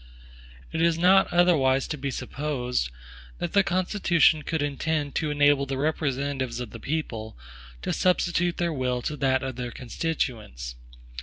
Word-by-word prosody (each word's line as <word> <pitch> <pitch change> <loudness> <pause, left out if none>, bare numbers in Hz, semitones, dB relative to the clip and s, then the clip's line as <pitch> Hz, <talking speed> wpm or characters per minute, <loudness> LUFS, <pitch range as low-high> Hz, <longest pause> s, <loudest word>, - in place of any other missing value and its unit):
It 160 - -1
is 170 -1 +3
not 190 +3 +5
otherwise 150 -7 +3
to - - -2
be 140 -1 -4
supposed, 125 - -2 0.5
that 175 - -4
the 200 - +6
Constitution 180 -4 +2
could 155 0 -2
intend 145 0 -1
to 155 - -1
enable 145 -1 +3
the 135 0 -2
representatives 135 -4 -1
of 120 -4 -5
the 115 - -9
people 115 - -4 0.5
to - - -1
substitute 175 -1 +1
their 170 -2 0
will 125 -3 -1
to 150 - -2
that 130 -1 +1
of 130 -2 -4
their 125 -1 -3
constituents. 115 - -3
145 Hz, 150 wpm, -26 LUFS, 130-165 Hz, 0.5 s, the